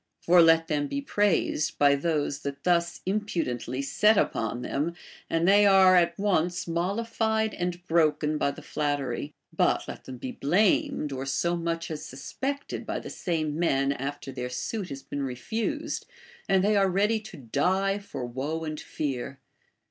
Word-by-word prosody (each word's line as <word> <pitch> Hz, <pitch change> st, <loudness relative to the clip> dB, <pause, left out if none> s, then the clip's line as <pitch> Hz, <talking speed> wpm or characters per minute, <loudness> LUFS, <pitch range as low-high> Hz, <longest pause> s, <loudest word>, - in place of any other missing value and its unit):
For 175 Hz, 0 st, +7 dB
let 165 Hz, 0 st, +5 dB
them 145 Hz, -2 st, 0 dB
be 280 Hz, -, -2 dB
praised 205 Hz, -, +1 dB
by 145 Hz, -1 st, +5 dB
those 145 Hz, -1 st, 0 dB
that 140 Hz, 0 st, -6 dB
thus 170 Hz, -1 st, +1 dB
ini 195 Hz, +3 st, +1 dB
76 -, -, -13 dB
BASHFULNESS. -, -, -5 dB
pudently 125 Hz, -5 st, -2 dB
set 210 Hz, +9 st, +3 dB
upon 115 Hz, -5 st, 0 dB
them, 155 Hz, +7 st, -2 dB, 0.3 s
and 165 Hz, +1 st, +1 dB
they 205 Hz, +1 st, +6 dB
are 190 Hz, -1 st, +7 dB
at 170 Hz, -1 st, +3 dB
once 180 Hz, -4 st, 0 dB
mollified 220 Hz, +5 st, 0 dB
and 175 Hz, 0 st, -3 dB
broken 155 Hz, -2 st, +2 dB
by -, -, +2 dB
the 140 Hz, -, -8 dB
flattery; 145 Hz, -2 st, -2 dB, 0.2 s
but -, -, +2 dB
let -, -, -8 dB
them 130 Hz, -, -8 dB
be 125 Hz, +1 st, -5 dB
blamed 170 Hz, -2 st, +1 dB
or 135 Hz, 0 st, -4 dB
so 170 Hz, +5 st, 0 dB
much 165 Hz, -1 st, -3 dB
as 155 Hz, -1 st, -5 dB
suspected 265 Hz, -, -5 dB
by -, -, -3 dB
the -, -, -7 dB
same 155 Hz, -3 st, -2 dB
men 140 Hz, -5 st, +2 dB
after 140 Hz, 0 st, -4 dB
their 125 Hz, -1 st, -4 dB
suit 185 Hz, -, -4 dB
has 135 Hz, 0 st, -7 dB
been 145 Hz, -, -5 dB
refused, 220 Hz, -, -3 dB, 0.4 s
and 190 Hz, -1 st, +4 dB
they 210 Hz, +1 st, +3 dB
are 195 Hz, -1 st, +4 dB
ready 205 Hz, +4 st, +2 dB
to 215 Hz, -5 st, -11 dB
die 185 Hz, -, 0 dB
for 135 Hz, -11 st, -6 dB
woe 140 Hz, +7 st, -3 dB
and 155 Hz, -1 st, -4 dB
fear. 135 Hz, -2 st, -4 dB
165 Hz, 170 wpm, -27 LUFS, 140-195 Hz, 0.4 s, For